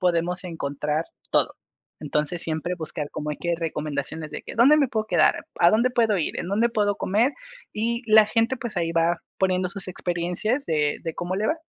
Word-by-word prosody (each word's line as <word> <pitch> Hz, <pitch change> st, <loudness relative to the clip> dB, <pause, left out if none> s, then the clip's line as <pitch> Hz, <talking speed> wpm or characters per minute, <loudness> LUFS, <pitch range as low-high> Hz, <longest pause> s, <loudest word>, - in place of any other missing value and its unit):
podemos 180 Hz, 0 st, +1 dB
encontrar 150 Hz, -2 st, -2 dB, 0.3 s
todo. -, -, +2 dB, 0.5 s
Entonces, 150 Hz, +3 st, -1 dB
siempre 160 Hz, +3 st, -2 dB
buscar 155 Hz, -3 st, -5 dB
como 150 Hz, 0 st, -4 dB
hay 150 Hz, -, -4 dB
que 175 Hz, 0 st, -1 dB
recomendaciones 155 Hz, -1 st, -4 dB
de 150 Hz, -, -6 dB
que: -, -, -8 dB
¿Dónde 265 Hz, +7 st, +7 dB
me 285 Hz, -3 st, +3 dB
puedo 220 Hz, -2 st, -2 dB
quedar?, 170 Hz, -7 st, +2 dB
¿A 170 Hz, -, +6 dB
dónde 235 Hz, +5 st, +3 dB
puedo 225 Hz, -5 st, +2 dB
ir?, 160 Hz, -, -2 dB
¿En -, -, -4 dB
dónde 215 Hz, +5 st, +2 dB
puedo 205 Hz, -3 st, 0 dB
comer? 225 Hz, +8 st, +2 dB, 0.4 s
Y 235 Hz, +3 st, 0 dB
la 215 Hz, -1 st, +8 dB
gente, 230 Hz, +4 st, +1 dB
pues, 235 Hz, -4 st, -6 dB
ahí 165 Hz, -1 st, 0 dB
va 165 Hz, +1 st, +1 dB, 0.2 s
poniendo 185 Hz, -1 st, +1 dB
sus 195 Hz, 0 st, -5 dB
experiencias 180 Hz, +9 st, -2 dB
de 150 Hz, -2 st, +1 dB
de 165 Hz, -1 st, -4 dB
cómo 180 Hz, +2 st, -3 dB
le 215 Hz, -, 0 dB
va. 310 Hz, -, +2 dB
180 Hz, 195 wpm, -24 LUFS, 160-215 Hz, 0.5 s, la